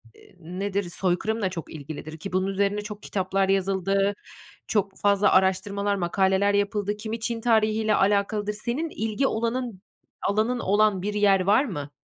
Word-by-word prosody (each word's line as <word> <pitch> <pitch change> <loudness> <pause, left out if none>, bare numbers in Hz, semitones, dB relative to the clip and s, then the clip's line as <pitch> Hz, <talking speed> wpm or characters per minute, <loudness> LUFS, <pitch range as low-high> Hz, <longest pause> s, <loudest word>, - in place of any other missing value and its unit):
eee, - - -19
eee, - - -21
nedir? 195 +4 -3
Soykırımla 190 +4 -1
çok 170 -3 -7
ilgilidir, 155 +1 -8
ki 190 +3 -8
bunun 185 +1 +1
üzerine 200 +1 0
çok 210 0 -8
kitaplar 190 0 0
yazıldı, 195 +1 +1 0.5
çok 200 -2 -1
fazla 200 0 +3
araştırmalar, 200 +2 +2
makaleler 190 +2 +2
yapıldı, 205 0 0
kimi 220 +1 -5
Çin 230 0 -3
tarihiyle 220 -2 +2
alakalıdır. 205 +1 +1
Senin 240 +10 -3
ilgi 225 +1 -1
olanın 230 -3 -2 0.5
alanın 220 +4 +1
olan 205 -1 +2
bir 205 +2 -2
yer 205 -2 +4
var 205 +9 +3
mı? 145 - -5
200 Hz, 150 wpm, -25 LUFS, 190-215 Hz, 0.5 s, yer